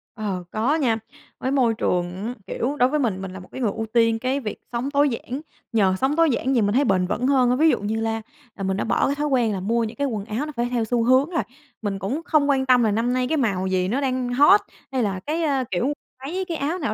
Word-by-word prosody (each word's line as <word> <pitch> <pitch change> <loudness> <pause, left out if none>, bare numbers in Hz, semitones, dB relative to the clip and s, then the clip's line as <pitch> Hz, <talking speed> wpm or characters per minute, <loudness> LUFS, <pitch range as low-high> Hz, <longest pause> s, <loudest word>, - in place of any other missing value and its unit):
Ờ, 200 -5 -3
có 235 +8 +1
nha, 235 -7 +1 0.4
với 260 - -2
môi 250 -5 +3
trường, 180 -1 -1
ưm, 245 +2 -3
kiểu, 275 +5 -2
đối 250 -1 +4
với 300 +2 0
mình, 205 -8 -1
mình 190 -1 -6
là 190 - -8
một 180 - -13
cái 260 - -6
người 220 -5 +1
ưu 225 0 -4
tiên 230 -1 +3
cái 260 +3 -1
việc 215 -4 -5
sống 245 +4 -2
tối 285 0 +3
giản, 255 +2 -4 0.3
nhờ 195 -5 +3
sống 275 +3 +1
tối 330 -2 +4
giản 260 +2 0
vậy 235 -4 +3
mình 205 +2 +1
thấy 280 +3 +4
bền 185 -4 +2
vững 250 +6 -1
hơn 260 -3 +4
á. 250 - +2
Ví 315 +2 +5
dụ - - 0
như 215 +2 -2
la, 225 0 -1 0.3
à, 195 - -7
mình 190 0 0
đã - - -1
bỏ - - +2
cái 280 - 0
thói 295 +1 -2
quen 245 -6 +2
là 190 - -3
mua 230 +4 +1
những 220 +1 -6
cái 285 - 0
quần 215 -6 -3
áo 230 +8 -3
nó 300 - -6
phải 240 +1 0
theo 235 -2 0
xu 235 +1 0
hướng 260 +5 +4
rồi, 335 - 0 0.4
mình 200 -2 -2
cũng 255 +12 -3
không 300 -4 +2
quan 265 -1 +2
tâm 250 -2 +5
là 220 - +3
năm 230 +4 0
nay 255 0 +1
cái 315 - +1
màu 200 -9 0
gì 185 -1 0
nó 255 +6 0
đang 255 -2 -1
hot 295 +11 +6 0.3
hay 255 -2 +1
là 195 -3 -1
cái, 325 +3 -1
a, 275 -4 +1
kiểu, 240 +11 0 0.3
mấy 365 +6 -2
cái 330 - -2
áo 310 +6 -2
nào 290 -10 -2
245 Hz, 285 wpm, -23 LUFS, 215-280 Hz, 0.4 s, hot